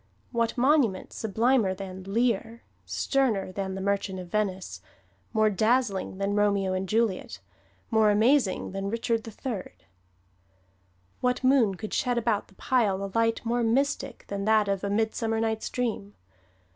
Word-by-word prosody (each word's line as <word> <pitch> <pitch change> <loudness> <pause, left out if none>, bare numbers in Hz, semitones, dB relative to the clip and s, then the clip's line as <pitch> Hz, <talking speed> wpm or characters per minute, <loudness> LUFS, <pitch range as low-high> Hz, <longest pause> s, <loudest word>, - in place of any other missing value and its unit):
What 235 0 0
monument 250 -7 +2
sublimer 220 -1 +1
than 190 -1 -8
"Lear," 230 +2 -1 0.2
sterner 235 -9 0
than 190 0 -4
"The 190 - -5
Merchant 200 -1 -1
of 180 -1 -8
Venice," 195 -2 -2 0.5
more 215 -1 +3
dazzling 215 -2 +1
than 200 +1 -1
"Romeo 200 -2 +2
and 185 0 -2
Juliet," 220 -3 0 0.5
more 220 -1 +4
amazing 220 -1 +2
than 195 +1 -3
"Richard 230 0 -1
III"? 225 - -5 1.5
What 250 +1 0
moon 255 -7 +4
could 215 +3 -7
shed 250 -3 0
about 230 -3 0
the 195 - -22
pile 205 -6 +1
a 195 - -4
light 230 0 +1
more 240 +1 +1
mystic 260 +2 0
than 200 0 -3
that 215 -1 +4
of 195 -1 -1
"A 200 - -1
Midsummer 220 +1 0
Night's 220 -1 -1
Dream"? 220 -5 -3
215 Hz, 145 wpm, -27 LUFS, 195-235 Hz, 1.5 s, more